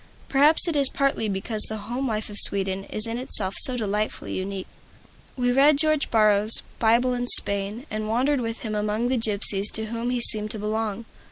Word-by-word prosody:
Perhaps 295 +5 +5
it 335 - -2
is 280 -2 +3
partly 275 -6 -2
because 205 +3 -3
the 220 - -6
home 255 +3 -4
life 215 -2 -4
of 205 - -6
Sweden 195 -1 +1
is 215 - -3
in 230 +1 -5
itself 200 -6 0
so 255 -1 +4
delightfully 210 -1 -4
unique. 190 0 -6 0.7
We 245 -1 0
read 280 +3 +3
George 310 -1 0
Borrow's 215 0 +2 0.2
"Bible 235 +3 +1
in 245 0 -4
Spain," 200 +3 +2
and 215 0 -5
wandered 255 +4 0
with 230 -1 -6
him 220 -3 -6
among 210 +3 -2
the 255 -1 -1
gypsies 205 -2 +3
to 220 - -1
whom 230 +1 -4
he 250 0 -2
seemed 215 -2 +1
to 215 - -5
belong. 215 +1 -4
220 Hz, 190 wpm, -23 LUFS, 210-250 Hz, 0.7 s, Perhaps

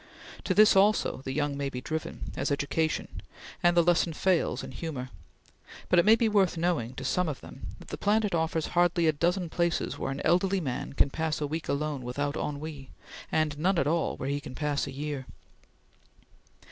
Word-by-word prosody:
To - - +1
this, 215 -1 +7
also, 200 -8 +3
the 135 - -2
young 145 +1 -1
may 140 0 -2
be 125 - -5
driven, 160 +4 -5
as 140 - -1
education, 150 +2 -1 0.4
and 175 0 +3
the 170 - +7
lesson 175 -1 +2
fails 185 +2 +1
in - - -7
humor; 140 -6 -5 0.8
but 180 - +5
it 175 - +4
may 220 +1 +8
be 230 0 +2
worth 195 -5 +2
knowing 160 -8 0
to 135 - -6
some 170 +6 +1
of 140 - -4
them - - -10
that - - -14
the - - -6
planet 210 -1 +2
offers 160 -1 0
hardly 175 -1 +3
a 160 - +5
dozen 175 +4 0
places 170 +1 -1
where - - -2
an 135 - -4
elderly 190 +2 +3
man 135 -7 -4
can 140 - +2
pass 160 0 -1
a 150 - -1
week 160 +3 -4
alone 145 -1 -1
without 140 +4 -2
ennui, 145 -2 -5 0.4
and 150 -2 0
none 185 +3 +2
at 140 - +2
all 160 +2 0
where 130 - -3
he 140 +1 -1
can 145 -3 -9
pass 145 -1 -1
a - - -5
year. 140 -1 -5
155 Hz, 195 wpm, -28 LUFS, 140-175 Hz, 0.8 s, may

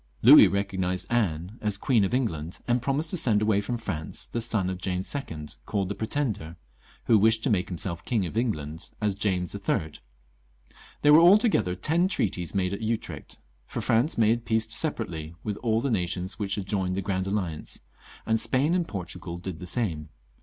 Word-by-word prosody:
Louis 125 -2 +10
recognised 95 -1 -1
Anne 95 -2 -1
as 105 -2 0
Queen 120 -6 +2
of 95 - 0
England, 90 - -2
and 120 0 +2
promised 140 +5 0
to 185 - 0
send 115 -9 +3
away 105 -1 +2
from 120 +4 -3
France 80 -9 -5
the 120 - -4
son 110 -5 0
of 95 -1 -4
James 90 0 -2
II., 80 - -5 0.2
called 100 -3 -1
the - - -1
Pretender, 110 - -2 0.5
who 110 -3 +5
wished 110 +2 +3
to 130 - +1
make 90 -4 +1
himseK 85 -1 -3
King 110 -6 0
of 85 - -6
England 80 - -2
as 105 -2 +1
James 95 -4 -1
III. 80 0 -1 1.1
There 150 0 +7
were 155 - +9
altogether 185 - +5
ten 165 - +1
treaties 90 - -1
made 95 -1 0
at 100 - -5
Utrecht, 110 0 -4 0.3
for - - -5
France 120 +8 +1
made 115 +1 +3
peace 110 0 0
separately 85 - -3
with 105 -2 -3
all 115 -1 0
the 135 0 -1
nations 90 -1 -2
which 100 -2 0
had 100 - -4
joined 95 -2 -1
the 100 - -2
Grand 95 -1 -1
Alliance, 95 -6 -3 0.4
and 110 0 +2
Spain 140 +8 +2
and 175 -2 +1
Portugal 90 -2 -5
did 90 -2 -6
the 90 - -7
same. 85 -7 -1
100 Hz, 185 wpm, -27 LUFS, 90-115 Hz, 1.1 s, Louis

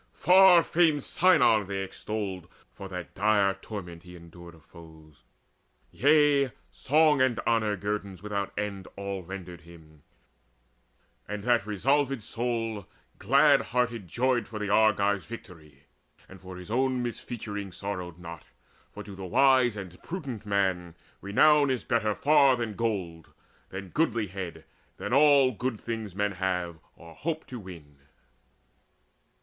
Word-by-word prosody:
Far 180 -2 +6
famed 160 -4 +2
Sinon 115 - +3
they 95 -1 -3
extolled 95 -3 -5 0.3
For 95 - -9
that 90 -2 -7
dire 100 -1 +2
torment 90 -6 -9
he 90 0 -13
endured 85 0 -13
of 80 - -21
foes; 80 0 -16 0.7
Yea, 145 -1 +3 0.2
song 150 0 +3
and 130 -3 +2
honour 110 -3 0
guerdons 100 -1 -4
without 100 -1 -3
end 100 -2 -4
All 100 -1 -4
rendered 90 -2 -9
him: 80 -2 -17 1.3
and 105 -1 -5
that 120 -3 +1
resolved 135 +4 0
soul 115 -4 -3 0.3
Glad - - +4
hearted 120 -5 -2
joyed 120 +3 0
for 110 - -7
the 105 -1 -3
Argives 100 -2 +2
victory, 80 - -12 0.4
And 95 -1 -14
for 95 -1 -10
his 90 +3 -10
own 130 +1 0
misfeaturing 105 -4 -6
sorrowed 90 -3 -6
not. 85 -3 -10 0.5
For - - -9
to 100 - -10
the 95 -1 -8
wise 130 0 +3
and 90 -3 -9
prudent 135 - -7
man 95 -4 -1 0.3
renown 145 +8 +4
Is 130 -2 -1
better 110 -4 0
far 140 -3 +4
than 120 -3 -4
gold, 95 -8 -4 0.4
than 95 0 -8
goodlihead, 105 - -2 0.3
Than - - -4
all 140 -2 +5
good 125 -1 -4
things 110 -5 -6
men 100 0 0
have 90 -3 -3 0.2
or 85 -1 -14
hope 160 - -4
to 125 - -8
win. 85 -8 -12
105 Hz, 135 wpm, -27 LUFS, 90-125 Hz, 1.3 s, Far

